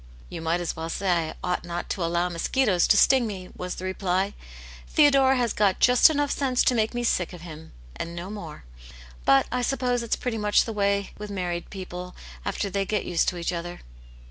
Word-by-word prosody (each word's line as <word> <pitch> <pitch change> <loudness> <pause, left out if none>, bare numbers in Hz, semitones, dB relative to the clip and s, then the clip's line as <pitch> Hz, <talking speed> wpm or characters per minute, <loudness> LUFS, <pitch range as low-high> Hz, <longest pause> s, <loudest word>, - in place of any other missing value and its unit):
''You - - -6
might 165 +2 0
as 175 - -3
well 160 0 -5
say 175 -3 0
I - - -8
ought 180 0 -1
not 175 0 -5
to 185 - -2
allow 170 +1 +1
mosquitoes 180 +3 +1
to 210 - +5
sting 260 -1 +5
me," 185 -3 -7
was 180 0 -5
the 185 - -6
reply, 190 +1 -1 0.3
" - - -16
Theodore 275 -3 +5
has 240 -3 0
got 200 -3 +2
just 250 +3 +6
enough 290 -2 0
seni^ 260 -3 +1
to - - +4
make 225 0 0
me 240 - -1
sick 185 -6 0
of 175 - -10
hirn, 160 -2 -10 0.3
and 170 0 -5
no 175 +3 -6
more. 170 - -8 0.6
But 135 - +5
I 250 - 0
suppose 250 -1 0
it's 235 - 0
pretty 235 -3 -3
much 210 0 +3
the 225 - -4
way 200 -1 0
with 210 0 -6
married 175 -3 -3
people 180 -2 -7 0.3
after - - -2
they 200 0 -1
get 210 +1 -2
used 175 -2 +1
to 180 - -7
each 170 +1 -2
other." 175 +1 -5
190 Hz, 215 wpm, -25 LUFS, 175-235 Hz, 0.6 s, just